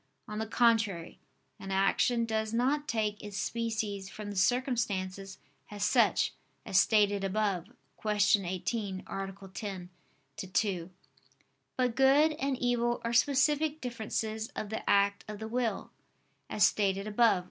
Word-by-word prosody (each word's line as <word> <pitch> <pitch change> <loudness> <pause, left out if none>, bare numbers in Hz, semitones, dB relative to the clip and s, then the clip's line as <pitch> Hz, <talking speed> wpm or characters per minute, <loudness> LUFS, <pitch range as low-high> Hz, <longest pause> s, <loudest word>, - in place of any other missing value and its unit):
On 210 0 -5
the 220 - -2
contrary, 225 -7 +1 0.4
An 195 - -8
action 195 +5 +2
does 220 0 -2
not 285 +5 +1
take 210 -2 -1
its 205 -2 -6
species 215 -4 -2
from 205 0 -7
the - - -7
circumstances 195 -3 0 0.3
as 205 -1 -2
such, - - +3 0.3
as 190 - +3
stated 205 -2 +3
above 195 -3 0 0.4
(Q. 215 - -3 0.3
18, - - -7
A. 185 +1 -3
10, 200 -3 -3 0.5
ad 185 -1 -9
2). 185 -5 0 0.9
But 250 -2 +1
good 275 +4 +5
and 275 -3 -2
evil 240 -1 0
are 235 - -1
specific 295 +4 +2
differences 220 -3 -3
of 210 - -4
the 220 - -4
act 200 0 +3
of 210 0 -6
the 220 +1 -6
will, 230 -3 -2 0.6
as 210 - +4
stated 195 -1 +1
above 215 0 +4
(A. - - -2
215 Hz, 140 wpm, -30 LUFS, 195-240 Hz, 0.9 s, good